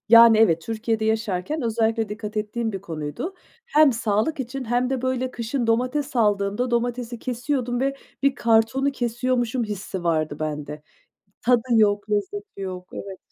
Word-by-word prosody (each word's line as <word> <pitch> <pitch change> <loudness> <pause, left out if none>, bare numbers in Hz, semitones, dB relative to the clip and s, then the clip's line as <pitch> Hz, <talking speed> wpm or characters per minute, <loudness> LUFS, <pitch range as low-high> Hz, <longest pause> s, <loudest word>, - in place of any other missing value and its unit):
Yani, 230 -1 +9
evet. 170 -7 +4
Türkiye'de 220 +2 -2
yaşarken 220 - -1
özellikle 225 -1 0
dikkat 210 0 -5
ettiğim 220 +2 -2
bir 195 -2 -5
konuydu. 160 - -5 0.3
Hem 305 - +5
sağlık 225 +7 0
için 265 +1 -4
hem 245 +2 +1
de, 265 -2 -1
böyle, 260 0 -1
kışın 235 +1 -2
domates 255 +5 0
aldığımda 210 +2 +1
domatesi 240 0 -1
kesiyordum 245 0 -2
ve 275 +1 0 0.3
bir 275 -1 +3
kartonu 235 +4 +2
kesiyormuşum 245 -1 0
hissi 195 -3 -5
vardı 155 -3 0
bende. 150 -1 -4 0.6
Tadı 245 0 +4
yok, 205 -1 +3
lezzeti 305 - -3
yok 185 -1 -6
Evet. 195 -1 -7
230 Hz, 145 wpm, -24 LUFS, 205-250 Hz, 0.6 s, Yani